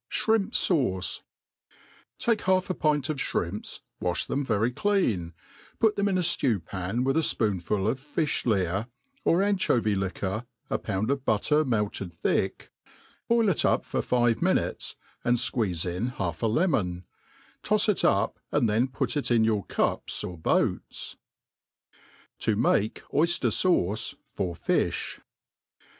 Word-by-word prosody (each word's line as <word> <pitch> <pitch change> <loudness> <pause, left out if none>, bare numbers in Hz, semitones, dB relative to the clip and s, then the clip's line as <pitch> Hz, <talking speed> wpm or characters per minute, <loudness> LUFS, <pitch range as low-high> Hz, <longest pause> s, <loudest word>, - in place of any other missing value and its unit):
Shrimp 220 -3 +1
Sauce. 125 - +1 1.0
TAKE 230 -2 +1
half 185 0 +2
a - - 0
pint 150 -5 +1
of 155 - -1
(hrimps, 90 -3 -3 0.2
walh 90 -1 -1
them 140 - -1
very 115 -1 +1
clean, 115 - 0 0.4
put 220 -2 +3
them 200 0 +1
in 190 - +1
a - - +2
ftew 115 - +1
pan 95 +7 -2
with 135 +1 +1
a - - +4
fpoonful 100 - +1
of 125 +4 0
fifli 145 - 0
)ear, 95 +6 -2 0.4
or 175 +4 +3
anchovy* 185 - +2
liquor, 95 +4 -3 0.2
a - - +1
pound 105 +4 -1
of 140 -2 -1
butter 140 +7 +2
melted 105 - -1
thick, 85 - -1 0.6
boil 230 -1 +3
it 190 - +2
up - - +2
for - - -1
five 120 -2 +1
mi - - +3
nutes, - - -2 0.3
and 120 +1 +3
fqueeze 105 -8 0
in 90 +6 -2
half 90 -9 -4
a 115 - +2
lemon; 110 - 0 0.6
tofs 215 0 +2
it 210 - +2
up, 100 +3 +2
and 145 -5 +2
then 110 +4 +2
put 130 +4 -2
it 145 - -1
in 115 -2 +4
your 110 -3 +1
cups - - -1
or 90 - -5
boats« 80 - -1 1.2
To 110 - +1
mah 105 -1 +3 0.3
Oyjier 170 +3 +2
Sauce 110 - +1 0.2
for 90 -3 -2
Fijh. - - -1
115 Hz, 150 wpm, -27 LUFS, 100-155 Hz, 1.2 s, a